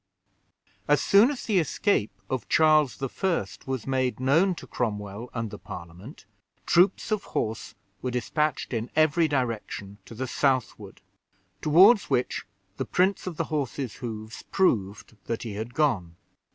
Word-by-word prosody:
As - - +4
soon 205 +6 +5
as 285 -4 -4
the 205 -5 +2
escape 165 - +1 0.2
of 130 -4 -4
Charles 155 -6 +3
I. 170 +6 -1 0.2
was 130 -4 -3
made 130 -2 0
known 165 +9 +3
to - - -10
Cromwell 105 0 -4
and 115 -3 -4
the - - -8
Parliament, 90 - -10 0.4
troops 180 +5 +3
of 215 -2 0
horse 110 0 -3 0.3
were 130 - -2
dispatched 140 +4 -1
in 115 0 -2
every 155 +1 +4
direction 115 -7 -3
to 115 - -11
the 130 +4 -3
southward, 130 -1 -1 0.6
toward 185 +9 +7
which 125 - -1 0.3
the - - -2
prints 190 +1 +1
of 170 -4 -5
the - - 0
horses' 135 -5 -3
hoofs 110 -2 -7
proved 105 - 0
that 115 - -3
he 115 -3 -5
had 110 +4 -6
gone. 100 - +1
130 Hz, 145 wpm, -26 LUFS, 110-155 Hz, 0.6 s, toward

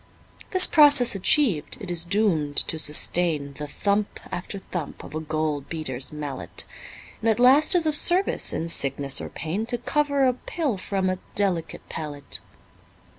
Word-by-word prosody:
This 370 -1 +6
process 290 -5 +6
achiev'd, 195 - +1
it 195 -5 -6
is 170 -1 +4
doom'd 170 -6 0
to 160 - 0
sustain 150 -1 +1
The 150 +1 -7
thump 200 +7 -2
after 180 +3 -6
thump 180 -5 -7
of - - -11
a 155 - -3
gold 155 -2 -3
beater's 135 -6 -4
mallet, 150 -2 -4 0.6
And 225 - +1
at 220 - +1
last 275 +8 +5
is 340 -2 +2
of 310 -1 +1
service 360 +5 +1
in 165 - -3
sickness 140 -2 +1
or - - -6
pain 185 +9 -4
To 245 0 -1
cover 285 +2 0
a 255 - +3
pill 260 - -3
from 190 0 -2
a 185 0 -2 0.2
delicate 180 -6 -1
palate. 145 -3 -6
185 Hz, 160 wpm, -24 LUFS, 155-245 Hz, 0.6 s, This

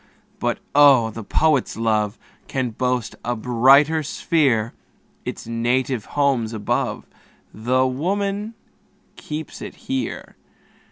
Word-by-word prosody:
But - - 0 0.2
oh! 140 -6 +6
the 115 +1 -7
poet's 150 +3 +1
love 110 -1 0 0.3
Can 130 -3 -2
boast 125 0 -1
a 120 0 -1
brighter 135 +7 +4
sphere; 135 -7 +1 0.5
Its - - -5
native 120 +1 -1
home's 130 -6 +1
above, 105 -2 -2 0.5
Tho' 125 +4 +1
woman 200 - -2 0.6
keeps 155 +1 -7
it - - -7
here. 265 0 -5
130 Hz, 105 wpm, -22 LUFS, 115-150 Hz, 0.6 s, oh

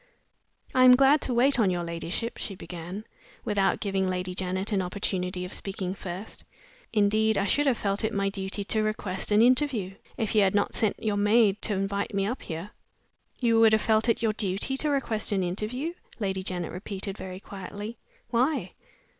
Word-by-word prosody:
"I 255 - +5
am 250 0 +9
glad 275 +3 +5
to 255 - -1
wait 255 +2 +4
on 210 -4 +4
your 175 -1 -1
ladyship," 170 +7 -4
she 195 - -5
began, 180 +3 -7 0.4
without 200 -2 +1
giving 195 -2 0
Lady 180 0 -2
Janet 185 +3 -2
an 200 -2 +2
opportunity 180 -1 -2
of 180 - -8
speaking 190 -2 -3
first. 190 +2 -7 0.5
"Indeed, 215 +1 +3
I 195 - +1
should 285 +9 +2
have 255 -4 +3
felt 200 +1 -1
it 220 - +1
my 200 -2 0
duty 195 +1 -3
to 215 +2 0
request 215 -3 -1
an 210 +2 +6
interview, 250 -6 +2 0.2
if 220 - -1
you 215 - +5
had 195 0 +3
not 205 - +1
sent 215 - -1
your 210 -2 0
maid 210 0 +4
to 215 - 0
invite 200 +2 -2
me 195 0 +1
up 245 +6 -3
here." 165 +6 -6 0.7
"You 230 -2 +3
would 225 -1 +6
have 220 - +4
felt 220 +1 +3
it 230 - +1
your 220 -1 +2
duty 205 +5 0
to 300 - 0
request 245 -8 0
an 195 -2 +1
interview?" 215 - -3 0.2
Lady 190 -3 -2
Janet 180 -2 -3
repeated, 195 +1 -5
very 185 -2 -7
quietly. 205 +3 -8 0.3
"Why?" 260 +6 +1
205 Hz, 190 wpm, -27 LUFS, 190-225 Hz, 0.7 s, am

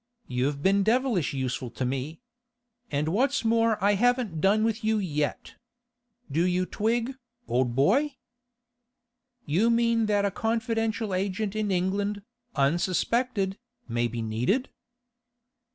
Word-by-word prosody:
You've 140 +3 -1
been 195 +1 +4
devilish 225 - +1
useful 130 -2 -3
to 125 +2 -3
me; 135 - -3 0.7
and 150 +2 -1
what's 255 - +1
more 225 -1 +3
I 205 +1 +5
haven't 235 -6 +1
done 205 +4 +3
with 225 +1 -1
you 220 0 +2
yet. 150 -7 -2 0.8
Do 160 +5 +2
you 180 0 +1
twig, 230 +6 -1 0.3
old 120 -1 0
boy?' 265 - +3 1.3
'You 190 +10 +2
mean 230 -1 +2
that 205 -1 +2
a 200 - 0
confidential 225 -1 -1
agent 195 +2 -1
in 215 -1 -1
England, 200 +2 -1 0.3
unsuspected, 190 - +1 0.3
may 120 +1 0
be 115 0 -4
needed? 125 - 0
200 Hz, 120 wpm, -27 LUFS, 150-225 Hz, 1.3 s, I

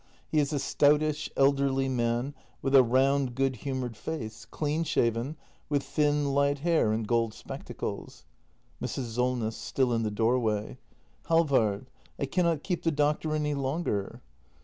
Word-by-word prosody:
He 155 - +3
is 145 0 +1
a 150 - 0
stoutish, 150 +2 +2
elderly 135 -1 +3
man, 120 +1 0 0.3
with 135 - 0
a 135 - +9
round, 130 +1 +2
good 135 -1 0
humoured 130 -1 -4
face, 110 -3 -6
clean 150 +7 -1
shaven, 120 0 0 0.3
with 145 -2 +1
thin, 145 -2 +1
light 140 0 +2
hair, 160 -6 +2
and 110 0 -1
gold 115 -1 +1
spectacles. - - -7 0.6
Mrs. 120 -4 -4
Solness. 125 -2 0
[Still 130 -3 0
in 115 - +1
the 110 - 0
doorway.] 110 -1 0 0.5
Halvard, 130 -9 +2 0.3
I - - -1
cannot 170 +1 +1
keep 180 -4 -2
the 165 - +1
doctor 150 +1 +1
any 150 -1 0
longer. 135 - -2
135 Hz, 145 wpm, -28 LUFS, 115-150 Hz, 0.6 s, a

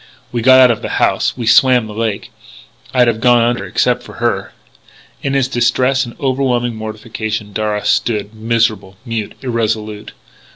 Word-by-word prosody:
We 120 - -2
got 130 +2 +6
out 125 -2 +7
of 115 - -3
the - - -3
house.... - - +1
We 120 - -4
swam 125 +1 +5
the 110 - -8
lake.... 110 -2 -3 0.6
I'd 125 -2 +3
have 115 -1 0
gone 120 -1 +4
under 120 0 0
except - - +1
for - - -12
her - - -2 0.4
" - - -27
In 135 0 -2
his 135 -2 +2
distress 130 +2 +1
and 120 - -12
overwhelming 130 -3 0
mortification, 110 -1 -5
Darragh 105 -1 -2
stood 105 -2 0
miserable, 110 -4 -1
mute, 115 -3 -4
irresolute. 110 -3 -3
115 Hz, 165 wpm, -16 LUFS, 110-125 Hz, 0.6 s, out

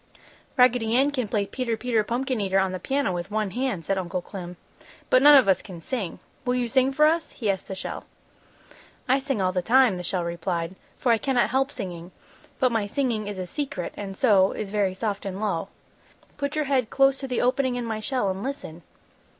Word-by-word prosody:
"Raggedy 245 -3 +4
Ann 275 +3 +4
can 255 -6 -2
play 205 -1 0
'Peter, 230 +2 -2
Peter, 230 -2 +1
Pumpkin 245 +1 -1
Eater' 195 -1 +1
on 190 -1 +2
the 185 - -4
piano, 270 -1 0
with 175 +1 -4
one 215 -2 -1
hand," 245 -7 -2
said 195 -1 0
Uncle 180 0 -3
Clem, 180 -3 -8 0.5
"but 255 - +6
none 290 +1 +9
of 260 - +5
us 190 -2 +3
can 180 -5 -10
sing. 200 -1 -4 0.3
Will 250 -1 0
you 245 -1 0
sing 260 +2 +2
for 300 +3 +4
us?" 320 +1 +2
he 215 -5 0
asked 190 - -5
the 190 - -5
shell. 190 - -6 1.0
"I 265 +2 +3
sing 270 -7 -1
all 185 - +2
the 180 0 0
time," 245 -1 +4
the 180 - -5
shell 180 0 -1
replied, 170 0 -3 0.2
"for 245 - +2
I 230 - +3
cannot 260 -1 +1
help 270 +1 +1
singing, 180 -5 -7 0.5
but 255 -2 +3
my 220 -3 0
singing 225 -3 -1
is 205 -1 -5
a 185 - -3
secret 285 +9 -4
and 195 -2 -6
so 195 -6 +4
is 205 -2 -5
very 200 -3 +1
soft 205 0 -3
and 195 -1 -5
low. 195 -4 -1 0.7
Put 285 +1 -3
your 305 -1 0
head 260 -5 +1
close 270 0 +3
to 270 - -5
the 250 - -1
opening 255 0 +1
in 245 -1 -3
my 220 -1 -3
shell 250 0 -1
and 190 +1 -3
listen!" 215 - -6
220 Hz, 215 wpm, -25 LUFS, 190-260 Hz, 1.0 s, none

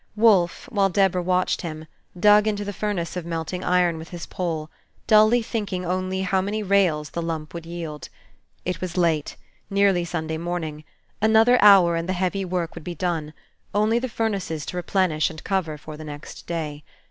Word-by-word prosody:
Wolfe, 205 -6 +3
while 200 -2 +2
Deborah 190 -1 +2
watched 180 +1 +1
him, 155 -2 -6 0.3
dug 210 +2 +6
into 205 -1 -1
the 205 - -4
furnace 195 -5 -3
of 180 - -3
melting 165 +2 -4
iron 175 -2 +2
with 160 - -9
his 175 -1 -7
pole, 160 -4 -4 0.3
dully 215 +2 +5
thinking 200 -5 -3
only 185 +1 -1
how 190 0 +1
many 210 +3 -2
rails 185 -7 +2
the 170 - -3
lump 160 -2 -4
would 170 -1 -7
yield. 165 -4 -6 0.6
It 180 -1 -3
was 185 -1 -4
late, 165 -4 +1 0.3
nearly 195 -3 +3
Sunday 160 -2 -3
morning; 160 -3 -4 0.4
another 220 +3 +5
hour, 195 -4 +7
and 165 +2 -3
the - - +1
heavy 190 +2 -1
work 180 -2 -2
would - - -9
be 175 +1 -5
done, 165 -3 -2 0.4
only 215 +3 +3
the 255 +1 -3
furnaces 195 -9 -2
to - - -6
replenish 175 -3 +1
and 155 -1 -10
cover 185 -6 -1
for 155 +1 -9
the 155 - -8
next 145 0 -9
day. 150 -3 -4
180 Hz, 180 wpm, -24 LUFS, 165-200 Hz, 0.6 s, hour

